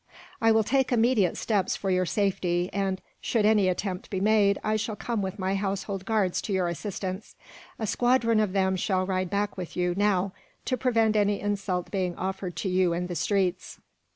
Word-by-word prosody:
"I 225 0 +5
will 220 0 +4
take 265 +4 +1
immediate 230 -5 +3
steps 200 -5 0
for 195 - -2
your 185 -1 +1
safety 180 -3 0
and, 195 -1 -1 0.2
should 220 -3 +1
any 210 -3 +4
attempt 185 0 -2
be 190 - -2
made, 205 0 +3
I 215 - +1
shall 215 0 -2
come 230 0 -2
with 190 0 -4
my 190 -1 -1
household 195 -1 -3
guards 205 -4 +1
to 205 - -3
your 185 -2 +1
assistance. 185 +2 -5 0.4
A 220 - -2
squadron 235 0 +2
of 210 -3 +1
them 190 -1 +2
shall 185 0 0
ride 185 -1 -1
back 200 +1 -1
with 180 -2 -6
you, 180 0 +1
now, 195 -1 +1 0.3
to 255 - 0
prevent 225 -3 +2
any 205 -1 +2
insult 195 -3 -2
being 185 -3 -1
offered 190 -1 -4
to - - -3
you 185 -2 +2
in 175 +1 -2
the 180 -1 -5
streets." 190 -1 -1
195 Hz, 190 wpm, -27 LUFS, 185-215 Hz, 0.4 s, I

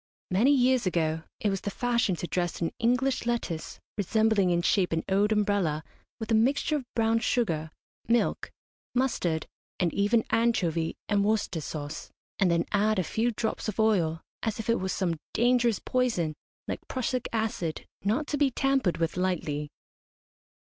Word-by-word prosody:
Many 210 +9 +4
years 255 -5 +3
ago 160 -2 0
it 210 - +1
was 195 - -2
the - - -3
fashion 235 -3 +1
to 175 - -4
dress 175 -1 -1
an 165 - -1
English 250 +1 +1
lettuce, 210 -9 -2 0.2
resembling 215 -1 +3
in 175 0 +1
shape 185 -2 +2
an 165 - 0
old 200 +2 +2
umbrella, 200 -8 +1 0.4
with 220 0 -5
a - - +4
mixture 270 +7 +2
of 255 -4 -8
brown 225 0 +3
sugar, 165 -10 0 0.4
milk, 235 0 +1 0.5
mustard, 180 -11 0 0.3
and 175 -3 +1
even 215 +3 +3
anchovy 175 -9 +1
and 205 -1 +2
Worcester 205 -5 0
sauce, 145 -1 -6 0.3
and 190 - +4
then 170 0 +2
add 210 +1 +2
a 185 - +2
few 225 +8 0
drops 225 -1 -2
of 215 - -6
oil, 175 -8 +2 0.2
as 225 -1 -2
if 225 +1 0
it 230 - +2
were 190 - -2
some 175 -4 -1 0.2
dangerous 240 -2 +3
poison, 230 -11 0 0.3
like - - -3
prussic 255 -1 -2
acid, 220 -8 -2 0.2
not 220 +10 +1
to 295 - -2
be 285 -1 +3
tampered 265 -9 +1
with 165 0 -1
lightly. 155 -5 -1
210 Hz, 160 wpm, -28 LUFS, 175-235 Hz, 0.5 s, Many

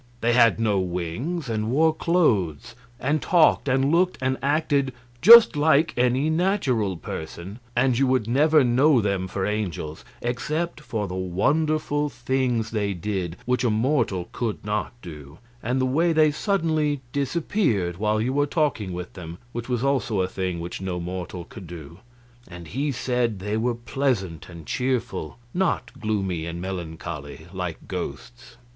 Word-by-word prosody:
They 120 +1 +2
had 115 -2 +5
no 105 -3 +2
wings, 95 - -3
and 110 -1 -2
wore 155 +5 +3
clothes, 120 - +1 0.3
and 145 +4 0
talked 170 -4 +4
and 135 +2 +2
looked 180 +2 +2
and 130 0 0
acted 140 -2 +1 0.3
just 230 -1 +9
like 150 +1 +3
any 125 +4 +2
natural 160 - +1
person, 85 +7 -7 0.2
and 125 +1 +3
you 135 +3 +2
would 130 -4 +1
never 150 +4 +4
know 130 +3 +4
them 100 -3 -1
for 95 +1 -2
angels 90 -7 -3 0.2
except 150 +7 -2
for 110 -8 -3
the 90 - -6
wonderful 145 - 0
things 120 -3 -1
they 100 -3 -1
did 90 -2 -3
which 125 +1 +1
a 120 - +3
mortal 110 -5 0
could 110 -4 -3
not 105 0 -1
do, 75 -3 -10 0.2
and 125 +3 -1
the 130 - +2
way 165 +6 +2
they 155 -1 +4
suddenly 155 -5 0
disappeared 140 - 0
while 105 +1 +1
you 125 +4 0
were 145 +1 +2
talking 140 - 0
with 90 +1 -6
them, 85 -2 -8
which 120 +1 -6
was 125 -1 0
also 130 -7 +1
a 90 - 0
thing 95 -2 -3
which 85 +2 -6
no 90 -2 -3
mortal 90 0 -5
could 90 - -11
do. 85 0 -10 0.5
And 85 0 -10
he 140 +5 -1
said 125 -4 -1
they 105 +3 -3
were 120 +2 0
pleasant 120 - -2
and 85 -3 -10
cheerful, 115 - -2 0.2
not 175 -9 0
gloomy 95 -6 -2
and 85 +1 -5
melancholy, 80 -4 -6
like 90 -3 -5
ghosts. 120 - -7
120 Hz, 155 wpm, -24 LUFS, 95-140 Hz, 0.5 s, just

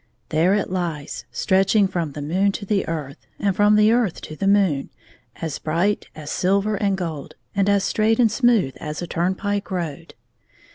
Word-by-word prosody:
There 170 +5 +3
it 205 -3 -1
lies, 165 -5 -3
stretching 195 +1 +3
from 170 -6 -3
the 145 - -6
moon 190 +7 +1
to 200 - -5
the 200 -1 0
earth, 150 -4 -5
and 200 -2 0
from 205 +1 +4
the 210 +1 +5
earth 230 -7 +1
to 155 - -8
the 195 - -2
moon, 195 -9 +2 0.5
as 160 -3 -5
bright 170 +7 0
as 155 -1 -7
silver 200 +3 +1
and 200 -1 0
gold, 155 -4 -5 0.2
and 200 0 +2
as 200 -1 +3
straight 220 +2 +2
and 230 -3 +4
smooth 230 - +2
as 150 +2 -5
a - - -2
turnpike 190 +4 -1
road. 170 -3 -5
190 Hz, 180 wpm, -22 LUFS, 160-205 Hz, 0.5 s, the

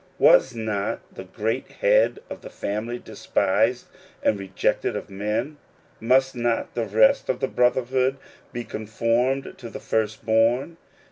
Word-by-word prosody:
Was 130 - +5
not 110 -3 -3
the 95 - -9
great 110 +6 -3
Head - - +3
of - - -8
the - - -9
family 110 +4 -4
despised - - 0 0.4
and 105 - +2
rejected 95 -1 -1
of - - -6
men? 105 +9 -2 0.4
Must 130 +3 +2
not 120 -1 -1
the 115 - -1
rest 110 +1 +3
of 130 - 0
the 135 - 0
brotherhood 130 +2 +1 0.3
be 120 -1 -4
conformed 115 +5 -1
to 120 - -8
the - - -8
First 110 0 -2
born 115 +8 +2
115 Hz, 140 wpm, -24 LUFS, 110-130 Hz, 0.4 s, Was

